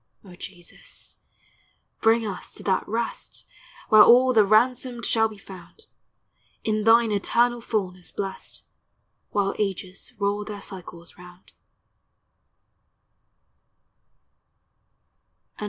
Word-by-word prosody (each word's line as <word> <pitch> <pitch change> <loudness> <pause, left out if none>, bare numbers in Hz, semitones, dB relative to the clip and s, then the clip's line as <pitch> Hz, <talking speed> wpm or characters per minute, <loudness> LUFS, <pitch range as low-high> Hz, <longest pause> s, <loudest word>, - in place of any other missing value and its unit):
O 185 - -13
Jesus, 180 - -10 0.8
bring 225 +1 +3
us 195 -3 -7
to - - -10
that 190 -2 0
rest, 230 +2 -4 0.4
Where 215 -1 +8
all 255 +4 +6
the 220 -3 +6
ransomed 240 +3 +2
shall 225 -1 +3
be 215 -1 -12
found, 195 - -13 0.8
In 215 -1 -1
thine 230 0 +5
eternal 235 +4 +1
fulness 185 -6 -4
blest, 195 -1 -6 0.7
While 200 -1 0
ages 195 -1 -4
roll 200 +1 -1
their 205 -1 -7
cycles 175 -3 -10
round. 180 +1 -15
210 Hz, 95 wpm, -24 LUFS, 190-230 Hz, 0.8 s, Where